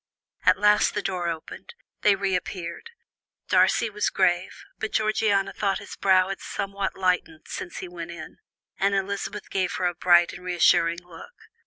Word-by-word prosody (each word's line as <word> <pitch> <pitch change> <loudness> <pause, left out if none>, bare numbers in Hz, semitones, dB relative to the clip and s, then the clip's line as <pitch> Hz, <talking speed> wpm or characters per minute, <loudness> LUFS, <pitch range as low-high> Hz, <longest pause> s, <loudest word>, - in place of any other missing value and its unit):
At - - +6
last 210 0 +3
the 210 - -1
door 180 -2 -2
opened; 165 - -8 0.3
they 205 -1 +5
reappeared; 185 - -3 0.6
Darcy 230 - +4
was 210 -1 -1
grave, 180 -1 0 0.2
but 220 - -4
Georgiana 215 -2 +1
thought 195 -2 0
his 205 - -9
brow 185 -1 +3
had 195 - -5
somewhat 195 0 -3
lightened 180 -4 -1
since 180 - -6
he 185 - -5
went 175 -1 -8
in, 165 -2 -10 0.4
and 200 +1 +2
Elizabeth 200 +1 -3
gave 185 -2 0
her 185 - -2
a 175 - +1
bright 175 0 +4
and 180 - -10
reassuring 170 -1 +3
look. 470 - -13
190 Hz, 160 wpm, -25 LUFS, 175-200 Hz, 0.6 s, At